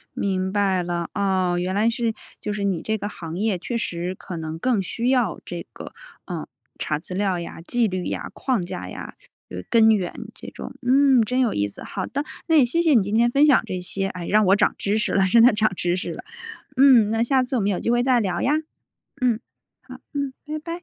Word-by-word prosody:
明 190 -1 -1
白 195 -3 +1
了， 170 -1 -3
哦， 185 -3 +1
原 185 +1 -2
来 215 +3 +3
是 230 -1 -1 0.3
就 210 - -3
是 205 - -3
你 190 -4 0
这 220 0 -1
个 205 0 -4
行 165 -2 -7
业 205 -2 0
确 235 +7 -3
实 180 -4 -3
可 180 -2 -7
能 160 0 -5
更 240 -4 +1
需 235 +6 -2
要 245 -8 +1
这 175 -1 -7
个， - - -9 0.3
呃， - - -5 0.3
查 150 -2 -2
资 175 +3 -8
料 195 -3 0
呀， 170 - -7
纪 230 +6 +1
律 185 -2 -3
呀， - - -4
框 255 -7 -1
架 90 - -6
呀， - - -8 0.3
呃， 90 0 -6
根 225 -1 +5
源 190 -5 0 0.2
这 - - -11
种。 - - -8
嗯， 270 -2 +5
真 250 +4 -1
有 245 -4 +2
意 100 0 0
思， 100 - -9
好 190 -2 -4
的， 285 +2 -3 0.2
那 325 - +3
也 265 - +6
谢 335 +8 +1
谢 320 -4 +4
你 230 - +6
今 205 +3 -2
天 235 +1 +4
分 280 +4 +4
享 285 -4 +5
这 185 -3 -4
些， 195 +2 -2
哎， 180 -3 -6
让 215 0 +4
我 195 - +6
涨 - - +2
知 205 +2 0
识 220 - 0
了， 195 -1 +3
真 230 +5 +5
的 245 +2 +8
涨 215 -1 +1
知 175 0 0
识 180 - -4
了， - - -9 0.5
嗯， 255 -6 +6
那 225 +1 +2
下 260 +1 +2
次 255 - -3
我 240 - +1
们 200 +1 +1
有 180 - -1
机 - - -2
会 240 +1 +3
再 255 -1 +3
聊 185 -5 -1
呀， 280 - +2 0.7
嗯， 240 -3 +2 0.4
好， - - -11
嗯， 280 -2 -2
拜 305 +1 -4
拜。 335 +3 -7
210 Hz, 250 characters per minute, -23 LUFS, 185-245 Hz, 0.7 s, 的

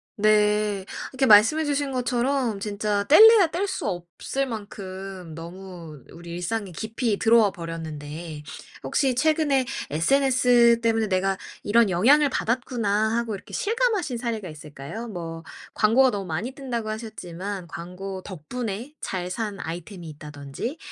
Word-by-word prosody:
네. 210 -1 +2 0.3
이렇게 265 0 +2
말씀해 220 +9 +6
주신 285 -1 -1
것처럼 250 -2 0
진짜 205 0 -1
뗄래야 420 - +8
뗄 350 +5 -2
수 380 - -4
없을 180 +9 -3
만큼 195 -6 -7
너무 170 -3 -10
우리 170 0 -10
일상에 185 +4 -3
깊이 220 +3 -2
들어와 225 -3 +5
버렸는데 160 -2 -7 0.4
혹시 270 -3 +1
최근에 290 -1 +2 0.3
'SNS 245 - +4
때문에 225 -1 +1
내가 190 0 +1 0.2
이런 225 0 +3
영향을 275 +12 +5
받았구나.' 225 -4 0
하고 235 -2 -1
이렇게 195 - -12
실감하신 435 - 0
사례가 230 -5 -3
있을까요? 150 +8 -8
뭐 165 -5 -6 0.3
광고가 240 +5 +5
너무 200 -4 -3
많이 180 +9 -3
뜬다고 240 -5 -4
하셨지만 200 -4 -6
광고 180 +3 -7
덕분에 220 - -6
잘 180 -2 -3
산 205 +1 -4
아이템이 175 +2 -7
있다든지 150 - -7
210 Hz, 305 characters per minute, -25 LUFS, 180-245 Hz, 0.4 s, 뗄래야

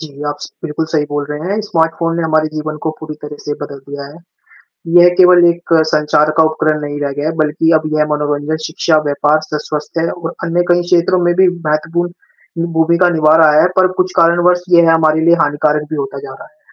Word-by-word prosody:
जी, 150 -3 -10
आप 145 - -3
स - - -8
बिल्कुल 160 0 -3
सही 150 -2 0
बोल 145 0 -3
रहे 150 - -4
हैं, 210 +2 -1
स्मार्टफ़ोन 165 -4 -1
ने 170 - -1
हमारे 155 -1 +1
जीवन 155 0 -5
को 160 - 0
पूरी 155 -1 -7
तरह 150 0 -8
से 145 - -4
बदल 140 -1 -7
दिया 140 0 -7
है, - - -15 0.8
यह 175 0 +8
केवल 180 -1 +6
एक 170 0 -6 0.2
संचार 150 0 +2
का 160 - +5
उपकरण 155 -1 -1
नहीं 145 0 -5
रह 140 -1 -2
गया 145 - -2
है, - - -2
बल्कि 155 +2 0
अब - - -10
यह 155 0 +1
मनोरंजन, 150 +1 -2
शिक्षा, 160 0 0
व्यापार, 145 +1 +1
स 150 - -4
स्वस्थ 150 +2 -5
है 165 +1 0
और 170 -2 -6
अन्य 170 +1 0
कई 175 0 +4
क्षेत्रों 175 +1 +2
में 175 0 +2
भी 185 - +5 0.2
महत्वपूर्ण, 165 +3 -1 0.5
ये 165 - -1
भूमिका 170 +2 +3
निभा 155 +1 +4
रहा 150 0 +5
है - - +4
पर 185 0 +3
कुछ 185 0 -1
कारणवश 175 +1 +3
यह 165 -1 +5
हमारे 160 -1 +2
लिए 170 - +6
हानिकारक 150 +1 0
भी 155 - -3
होता 135 0 -7
जा 135 - -9
रहा - - -12
है। - - -39
155 Hz, 220 wpm, -14 LUFS, 150-170 Hz, 0.8 s, यह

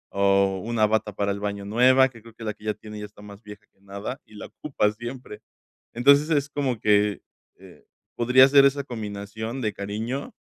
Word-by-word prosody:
o 100 -1 +2
una 115 -2 +1
bata 110 0 0
para 100 +1 -1
el 100 - -4
baño 100 -1 -4
nueva, 130 +5 +4
que 115 -3 -16
creo 115 +1 -15
que 115 - -11
la 105 - -2
que 105 - -18
ya 105 - 0
tiene 105 0 -10
ya 105 - -6
está 105 0 -16
más 100 0 -12
vieja 105 0 -12
que 95 - -36
nada 100 +6 -7
y 110 - -18
la 105 - -8
ocupa 130 -8 -1
siempre. 120 0 -9 0.5
Entonces, 140 +6 +4
es 145 -3 +1
como 130 -6 -2
que, 105 -1 +2 0.4
eh, - - -17 0.3
podría 125 +2 +6
ser 140 0 +6
esa 140 +1 +2
combinación 110 +1 -6
de 110 -4 -1
cariño 110 +8 -5
110 Hz, 200 wpm, -24 LUFS, 105-125 Hz, 0.5 s, podría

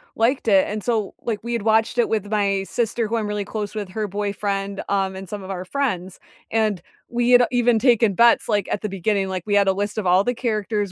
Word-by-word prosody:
liked 235 +3 +1
it, 195 -3 +5
and 210 0 -4
so, 220 -5 -1
like, 225 -3 -2
we 240 +1 -3
had 235 - -1
watched 220 +2 +2
it 240 - +3
with 215 -2 -1
my 200 -2 +1
sister 230 -1 -1
who 230 +2 -1
I'm 215 -2 -2
really 210 -1 -3
close 210 0 -5
with, 205 -3 -4
her 210 +2 -3
boyfriend, 200 0 -3
um, 195 -1 0
and 190 -1 -8
some 205 -2 -6
of 190 - -7
our 185 -1 -4
friends, 190 -6 -3 0.3
and 215 -5 0 0.3
we 240 +1 0
had, 245 0 +7
uh, - - +1
even 245 -2 +3
taken 230 -4 +3
bets, 235 +4 +4
like, 205 -3 +1
at - - -1
the 210 - -3
beginning, 195 +1 -1
like, 185 -2 -3
we 210 - -2
had 200 -1 +4
a 190 - +4
list 205 +2 -3
of 195 - -2
all 180 +2 +4
the 245 - 0
characters, 215 -4 -2
210 Hz, 245 wpm, -22 LUFS, 195-230 Hz, 0.3 s, had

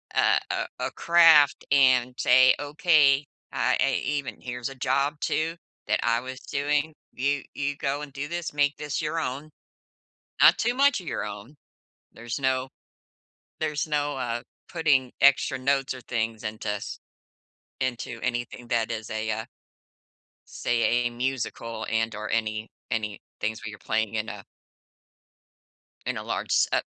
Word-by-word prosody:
uh, - - +4
a - - -1 0.2
a - - -8
craft 165 -4 +6
and 130 -3 +4
say, 130 +1 +6
"Okay, 145 -1 +4 0.3
I - - +2
e - - +2 0.2
even 140 -2 -5
here's 125 0 -4
a 135 - -10
job 140 +3 0
too 165 +1 0 0.3
that - - +2
I 115 0 +2
was 130 +1 -7
doing. 150 +2 -1 0.2
You 140 +2 0
you 145 0 -2
go 140 +1 -2
and 150 -2 -7
do 140 +1 -5
this, 170 0 -4
make 145 0 +2
this 150 -1 -3
your 160 +1 -1
own, 145 +2 -4 0.9
not - - +8
too 240 +2 +1
much 275 -3 +4
of 175 - -11
your - - -2
own." 105 +7 -8 0.6
There's 120 +3 -5
no 130 -1 0 0.9
there's 150 0 -1
no, 145 -1 -1
uh, 120 -2 -2 0.3
putting 140 -7 +2
extra 140 -1 +4
notes 135 0 +1
or 130 - -9
things 115 -2 -2
into 110 0 -4
s 105 -1 -4 0.8
into 120 -2 -3
anything 120 -1 -3
that 115 -1 +1
is 110 -1 -5
a, 110 0 -2
uh 110 +1 -3 1.0
say, 120 -1 -1 0.2
a - - 0
musical 120 -2 -3
and 115 0 0
or 105 +1 -5
any 110 -1 -1 0.2
any 105 -3 -2 0.2
things 110 +1 -2
where 110 - -4
you're 105 - -11
playing 110 -1 -1
in 110 0 -2
a 100 -2 -7 1.6
in - - -1
a - - -4
large, - - -3
s - - +4
uh, - - +3
130 Hz, 155 wpm, -26 LUFS, 115-145 Hz, 1.6 s, not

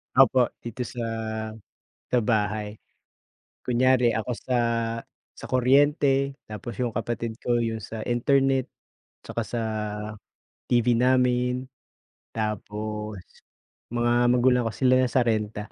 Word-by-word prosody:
Opo, 130 -1 +6 0.2
dito 120 +1 -5
sa 120 - -6 1.1
sa 125 - +1
bahay, 105 -1 -1 0.9
kunyari 125 -1 +3
ako 110 +3 -3
sa, 130 - -2 0.8
sa - - -10
kuryente, 140 +1 +3
tapos 105 +1 -7
yung 120 -3 -1
kapatid 115 0 -3
ko 120 -1 +1
yung 115 -1 -1
sa 110 +1 -6
internet, 135 +2 +2 0.5
'tsaka 115 - -4
sa 120 0 -3 1.1
TV 120 0 +4
namin, 125 +1 +2 0.7
tapos 105 -2 -4 0.7
mga 120 0 +1 0.2
magulang 125 0 +4
ko - - -2
sila 130 -1 +4
na 130 - +3
sa 130 - +3
renta. 105 -2 -2
120 Hz, 110 wpm, -26 LUFS, 110-130 Hz, 1.1 s, Opo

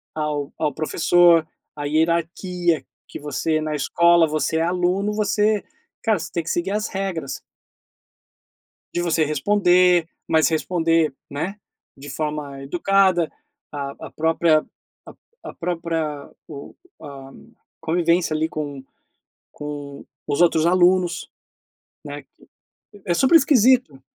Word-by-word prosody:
ao 150 -2 -3
ao 150 -2 0
professor, 165 +1 +3 0.3
à 145 -1 -5
hierarquia 170 +2 0 0.2
que - - -9
você 150 +2 -1
na 155 0 -2
escola 170 +3 +3
você 155 +1 -1
é - - +1
aluno, 180 +4 0
você 210 0 +1 0.4
cara, 220 -3 +2
você - - -7
tem 170 - -2
que 165 - -6
seguir 175 +3 -1
as 210 +1 -1
regras 190 -4 -4 1.6
de 175 - 0
você 165 -2 +1
responder, 180 +2 +3 0.2
mas 160 -1 +3
responder, 165 -2 +1 0.2
né, 160 +8 -4 0.4
de 140 +1 -10
forma 150 -1 -4
educada 175 +3 +2 0.4
a 140 -1 -5
a - - -11
própria 160 0 +2 0.4
a - - -11 0.3
a - - -9
própria 165 -4 -3 0.2
o 140 -2 -10 0.3
a 135 -3 -10 0.5
convivência, 170 0 +1
ali, 160 +1 0
com 145 -3 -6 0.7
com 145 -1 -8 0.2
os 145 - 0
outros 165 -2 +4
alunos, 180 0 +2 0.8
né, - - -7
que - - -25 0.6
é 175 - +1
super 265 - +5
esquisito. 255 - +3
165 Hz, 120 wpm, -22 LUFS, 150-180 Hz, 1.6 s, super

